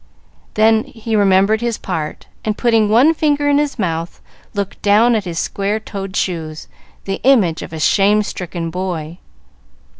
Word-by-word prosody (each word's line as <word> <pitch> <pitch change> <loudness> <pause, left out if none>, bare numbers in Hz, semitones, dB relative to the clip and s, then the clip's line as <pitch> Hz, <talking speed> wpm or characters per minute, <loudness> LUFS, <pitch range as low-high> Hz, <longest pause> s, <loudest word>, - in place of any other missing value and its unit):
Then 220 +1 +3
he 225 -1 -4
remembered 200 +2 +3
his 235 -2 -1
part, 160 -5 -5 0.2
and, 215 -1 -2
putting 225 -3 +2
one 250 +9 +5
finger 295 -2 +1
in 290 0 +3
his 295 -2 -2
mouth, 170 -4 -3 0.4
looked 200 -1 -4
down 215 +4 +4
at 215 -3 0
his 170 -2 -5
square 200 +5 -1
toed 195 -3 -7
shoes, 160 -4 -3 0.4
the 195 0 -3
image 215 -12 +3
of - - -8
a 160 - -6
shame 205 +6 +3
stricken 175 -4 -5
boy. 175 -2 -4
200 Hz, 155 wpm, -17 LUFS, 180-225 Hz, 0.4 s, one